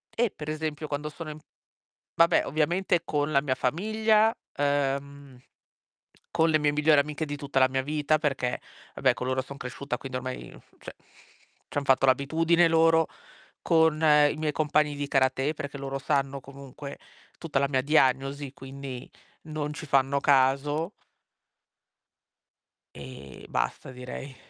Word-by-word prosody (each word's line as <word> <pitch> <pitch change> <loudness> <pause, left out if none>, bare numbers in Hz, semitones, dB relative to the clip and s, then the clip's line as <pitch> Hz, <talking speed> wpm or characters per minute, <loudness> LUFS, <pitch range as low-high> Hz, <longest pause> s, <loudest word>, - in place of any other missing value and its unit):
Eh, 235 0 +2
per 150 -5 -10
esempio 155 0 -3
quando 150 +1 -3
sono 155 0 -7
in 150 - -10 0.8
vabbè, 165 0 +4
ovviamente 170 +3 +1
con 150 -1 -1
la 140 - +3
mia 135 -3 -1
famiglia, 215 - +2 0.2
ehm, 140 -1 -2 0.9
con 165 -1 +2
le 155 -1 +3
mie 150 0 +2
migliori 150 0 +4
amiche 150 +2 -2
di 145 -1 -4
tutta 140 -1 -5
la 130 - +6
mia 130 0 -1
vita, 150 +2 +1
perché, 135 -5 -1 0.3
vabbè, - - +3
con - - -5
loro 130 0 0
son 140 +2 -10
cresciuta, 125 0 -5
quindi 130 -1 -5
ormai, 130 0 -7 0.2
cioè, - - -9 0.7
c'han 145 - -3
fatto 135 -1 +4
l'abitudine 160 +6 +3
loro, 165 0 +4 0.6
con 160 -2 +3
i 150 -2 +4
miei 155 -1 -1
compagni 150 -1 +1
di 145 0 -3
karate, 135 +2 +1
perché 145 -2 -6
loro 135 0 -4
sanno 140 -1 -1
comunque 140 +1 -10 0.4
tutta 160 -5 -1
la 140 0 +1
mia 130 -2 +1
diagnosi, 135 -1 +1
quindi 135 -1 -8 0.3
non 155 -1 -4
ci 155 - -7
fanno 135 0 +2
caso 140 +6 +2 2.0
ehm, 95 - -10
basta, - - -2
direi. 130 +2 -8
145 Hz, 140 wpm, -27 LUFS, 135-155 Hz, 2.0 s, la